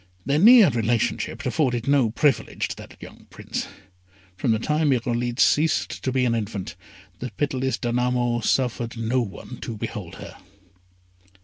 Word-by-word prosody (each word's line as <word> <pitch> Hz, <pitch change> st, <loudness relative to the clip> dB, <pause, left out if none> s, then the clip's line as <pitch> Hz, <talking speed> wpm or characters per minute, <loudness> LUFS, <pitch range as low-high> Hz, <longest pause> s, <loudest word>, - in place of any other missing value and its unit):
Their 145 Hz, +2 st, +1 dB
near 225 Hz, -1 st, +8 dB
relationship 115 Hz, -1 st, -1 dB
afforded 125 Hz, -6 st, 0 dB
no 140 Hz, -5 st, +3 dB
privilege 135 Hz, +5 st, 0 dB
to -, -, -5 dB
that -, -, -12 dB
young -, -, -13 dB
Prince; -, -, -5 dB, 0.7 s
from 95 Hz, -, -2 dB
the 110 Hz, -, +3 dB
time 150 Hz, +6 st, 0 dB
Irolite 120 Hz, -1 st, -1 dB
ceased 155 Hz, +1 st, +2 dB
to 130 Hz, -, 0 dB
be 130 Hz, 0 st, +1 dB
an 120 Hz, -, +1 dB
infant 105 Hz, -3 st, -4 dB, 0.4 s
the 125 Hz, -, -4 dB
pitiless 130 Hz, -4 st, -1 dB
Danamo 120 Hz, +1 st, 0 dB
suffered 120 Hz, -1 st, 0 dB
no 115 Hz, +3 st, 0 dB
one 115 Hz, +3 st, -7 dB
to 115 Hz, -3 st, -6 dB
behold -, -, -6 dB
her. -, -, -10 dB
125 Hz, 145 wpm, -24 LUFS, 115-135 Hz, 0.7 s, near